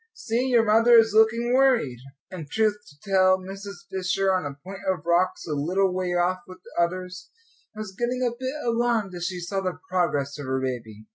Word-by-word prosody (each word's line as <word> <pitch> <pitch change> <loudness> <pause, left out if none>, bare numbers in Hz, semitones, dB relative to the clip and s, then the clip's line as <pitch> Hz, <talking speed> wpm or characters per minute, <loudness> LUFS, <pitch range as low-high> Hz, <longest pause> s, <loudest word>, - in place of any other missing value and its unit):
"See, 240 +3 -1
your 240 -3 +4
mother 225 +3 +5
is 225 -2 +5
looking 230 +2 +3
worried." 250 - +3 0.3
And, 165 -6 -8
truth 215 +2 +2
to 145 -1 -18
tell, 185 -1 +5
Mrs. 195 0 -9
Fisher, 190 +1 0
on 185 -6 0
a 140 -1 -8
point 190 +1 -8
of 180 -5 -2
rocks 175 +2 +1
a 155 - -3
little 180 +6 +1
way 180 -1 -1
off 180 +1 +1
with 185 - -11
the 170 - 0
others, 180 +1 -5 0.5
was 215 -3 -7
getting 245 +3 -1
a 235 - -2
bit 260 +3 -4
alarmed 230 -4 0
as 175 -1 -4
she 180 -1 -4
saw 195 +3 -3
the 185 -1 -3
progress 150 -6 0
of 140 - -6
her 130 0 0
baby. 115 -5 -5
185 Hz, 200 wpm, -25 LUFS, 175-220 Hz, 0.5 s, mother